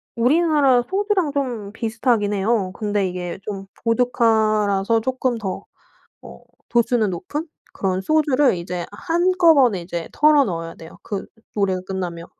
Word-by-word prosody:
우리나라 275 0 +3
소주랑 390 -4 0
좀 245 -8 -3
비슷하긴 225 -1 0
해요. 200 -1 0
근데 205 -2 -1
이게 180 -1 -5
좀 195 -2 -6 0.2
보드카라서 220 -3 +2
쪼끔 255 0 -1
더 195 -4 -5 0.6
어 - - -13 0.3
도수는 235 -3 +2
높은 240 - -5 0.3
그런 190 -1 -1
소주를 290 -1 +2
이제 175 0 -4
한꺼번에 330 - +3
이제 170 -1 -5
털어 300 -1 +5
넣어야 165 -5 -4
돼요, 160 0 -13
그 200 -2 -3 0.3
노 210 - -2
노래가 190 -2 +1
끝나면. 175 -3 -5
220 Hz, 295 characters per minute, -21 LUFS, 190-270 Hz, 0.6 s, 털어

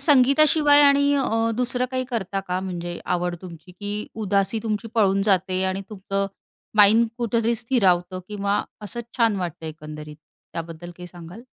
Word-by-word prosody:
संगीताशिवाय 290 +1 +5
आणि 280 0 +5
अ, 230 -4 +1
दुसरं 250 0 0
काही 255 0 -1
करता 195 -4 -2
का 180 0 0
म्हणजे 175 -2 -5 0.2
आवड 175 0 -1
तुमची 170 0 -11
की 205 +3 -6 0.3
उदासी 200 +2 +1
तुमची 220 0 -2
पळून 195 -3 +3
जाते 185 0 +1
आणि 190 +1 -1
तुमचं 195 -1 -2 0.5
माइंड 215 +3 +6
कुठेतरी 230 0 +1
स्थिरावतं 190 -7 +1
किंवा 200 -1 -1 0.2
असं 210 +3 -5 0.2
छान 230 -4 +3
वाटतं 170 -3 -5
एकंदरीत. 150 -1 -8 0.4
त्याबद्दल 165 +1 -7
काही 180 - -9
सांगाल? 175 +6 -11
200 Hz, 145 wpm, -23 LUFS, 180-235 Hz, 0.5 s, माइंड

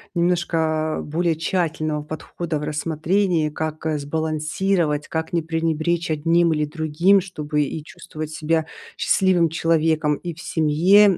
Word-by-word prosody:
немножко 165 -3 +1
более 165 +2 0
тщательного 155 -3 -1
подхода 155 +1 -4
в - - -6
рассмотрении. 160 +3 0
Как, 155 +1 -4
э, 155 - 0
сбалансировать, 155 +2 -1
как 160 +1 -3
не 170 - +2
пренебречь 165 +1 -1
одним 165 +2 +3
или 150 0 0
другим, 160 +5 +3
чтобы 150 -5 -2
и 150 +2 -4
чувствовать 155 0 -8
себя 160 +1 0 0.3
счастливым 180 -3 +3
человеком 160 -1 +2
и 175 +2 -6
в - - -15
семье, 175 +6 +4
160 Hz, 130 wpm, -22 LUFS, 155-170 Hz, 0.3 s, семье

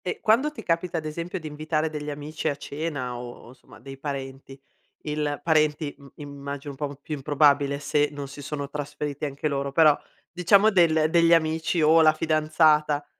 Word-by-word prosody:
E 180 - -3
quando 240 +8 +2
ti 300 - -10
capita 170 +1 -1
ad 155 - -4
esempio 170 +5 -5
di 160 - -13
invitare 155 +1 -2
degli 150 -1 -5
amici 150 +2 -5
a 145 - 0
cena 145 -3 -5
o 120 -1 -10
insomma 125 0 -17
dei 135 -1 -11
parenti, 135 -1 -7 0.4
il 150 -1 -2
parenti 155 -2 +1
im 140 -1 -16
immagino 140 0 -7
un - - -11
po' 140 - -9
più 155 +2 -7
improbabile 140 0 +2
se 145 +1 0
non 145 -1 -6
si 140 +1 -10
sono 145 0 -5
trasferiti 145 0 -5
anche 140 +1 -3
loro, 140 -1 -2
però 155 0 +5 0.4
diciamo 195 +5 +4
del 160 -5 +4
degli 170 0 +5
amici 160 +1 0
o 160 +2 +6
la 155 -1 +6
fidanzata, 155 -1 +2
150 Hz, 175 wpm, -25 LUFS, 140-160 Hz, 0.4 s, o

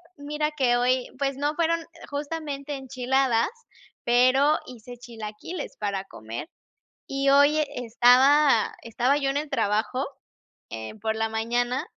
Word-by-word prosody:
mira 300 +1 -2
que 260 -5 +2
hoy, 250 +1 +1
pues, 275 -1 0
no 290 +2 -1
fueron 335 0 +1
e 335 +1 -15
justamente 290 -1 -4
enchiladas, 260 -2 +1 0.6
pero 255 +5 +4
hice 245 0 -11
chilaquiles 235 +7 -7
para 200 -2 -2
comer, 110 - -8 0.6
y 275 0 +1
hoy 285 +2 +5
estaba 250 +2 +4
estaba 245 +4 +1
yo 275 -2 0
en 275 - 0
el 300 +1 -4
trabajo, 215 +6 0 0.7
eh, 110 - -6
por 220 +1 -1
la 225 0 0
mañana, 240 +3 -1
260 Hz, 130 wpm, -25 LUFS, 235-285 Hz, 0.7 s, hoy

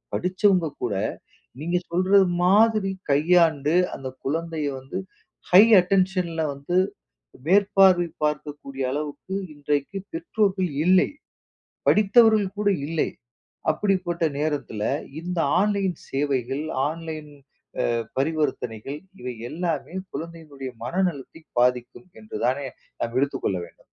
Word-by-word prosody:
படிச்சவங்க 185 -2 +2
கூட, 110 -5 -2 0.7
நீங்க 170 +3 0
சொல்றது 190 +2 +4 0.2
மாதிரி 205 0 +4 0.2
கையாண்டு, 160 0 +3 0.2
அந்த 135 - -7 0.2
குழந்தைய 160 +1 -2
வந்து 135 +8 -6 0.5
ஹை 185 +3 +10 0.2
அட்டென்ஷன்ல 180 -3 0
வந்து 140 +6 -4 0.7
மேற்பார்வை 190 -1 +5 0.2
பார்க்கக்கூடிய 145 -2 -3
அளவுக்கு 150 +6 -5 0.2
இன்றைக்கு 145 +4 -2 0.2
பெற்றோர்கள் 205 - 0 0.2
இல்லை. 185 +1 +5 0.8
படித்தவர்கள் 215 -1 +5
கூட 210 -1 +2 0.2
இல்லை. 160 0 0 0.6
அப்படிப்பட்ட 180 -1 -1 0.2
நேரத்துல 145 -8 -2 0.4
இந்த 180 0 -3 0.2
ஆன்லைன் 200 -2 +1
சேவைகள், 135 0 -1 0.3
ஆன்லைன் 160 -1 -6 0.6
அ - - +1 0.3
பரிவர்த்தனைகள் 140 -4 -2 0.2
இவை 125 0 -5 0.2
எல்லாமே 170 +1 -3 0.2
குழந்தையினுடைய 155 -5 -7
மனநலத்தை 165 -1 -2 0.2
பாதிக்கும் 125 +7 0
என்றுதானே 125 +6 -2 0.4
நம்ம 115 +1 -4
எடுத்துக் 140 -1 -2
கொள்ள 95 - +1
வேண்டும். - - -21
165 Hz, 100 wpm, -24 LUFS, 140-185 Hz, 0.8 s, ஹை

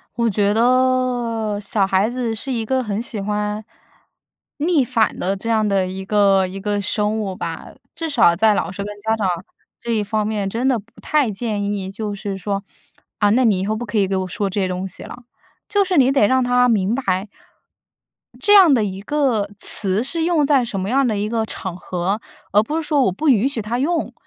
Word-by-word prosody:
我 235 0 +1
觉 205 0 +1
得 245 -3 +1
小 205 -1 0
孩 195 +2 +2
子 240 -2 -2
是 245 +5 -5
一 230 -3 -1
个 260 +3 0
很 210 -2 -3
喜 225 -3 -4
欢 210 +1 -2 0.9
逆 310 -1 +2
反 225 -2 +1
的 195 +2 0
这 230 +4 -6
样 220 -1 +2
的 195 -2 +1
一 190 +1 -5
个 195 -1 +3
一 190 +2 -7
个 205 0 -1
生 210 +2 0
物 195 -3 -3
吧， - - -6 0.3
至 330 -1 -4
少 230 - +4
在 215 +3 +4
老 - - -1
师 200 +1 -5
跟 210 +1 -6
家 220 +1 +1
长 210 -3 -1 0.5
这 235 - -4
一 220 -2 +1
方 210 +1 -1
面 205 -2 -2
真 235 +5 -1
的 255 -4 +2
不 200 - -16 0.2
太 295 -6 +1
建 210 0 -3
议， 200 -2 -3
就 210 0 -4
是 200 -1 -4
说， 200 0 -3 0.6
啊， 205 - +4
那 245 +5 +3
你 205 -5 +3
以 190 - -2
后 215 +2 -1
不 240 +2 -4
可 230 - -3
以 195 - +2
给 195 - -1
我 185 0 -2
说 195 +2 -2
这 195 - -2
些 185 - +1
东 185 +1 -3
西 185 - -6
了。 245 - -10 0.5
就 405 -1 +3
是 370 -2 0
你 265 -1 +5
得 270 -7 +4
让 260 +2 +3
他 250 0 +3
明 210 -1 +1
白 195 -6 -1 1.1
这 410 - +4
样 370 -8 +8
的 230 - +3
一 195 -1 -4
个 245 -4 0
词 200 +1 -1
是 325 +5 -2
用 330 -4 +2
在 275 -3 +3
什 200 -4 -4
么 190 +1 -3
样 270 +3 +3
的 215 -3 0
一 205 +1 -2
个 225 -1 0
场 190 -4 -5
合， 180 +3 -2 0.3
而 210 - +5
不 295 +8 -4
是 325 - 0
说 295 -3 +2
我 190 - +2
不 300 - 0
允 245 -1 +4
许 260 -5 -3
他 230 +4 -3
用。 330 +5 -1
215 Hz, 240 characters per minute, -20 LUFS, 200-250 Hz, 1.1 s, 样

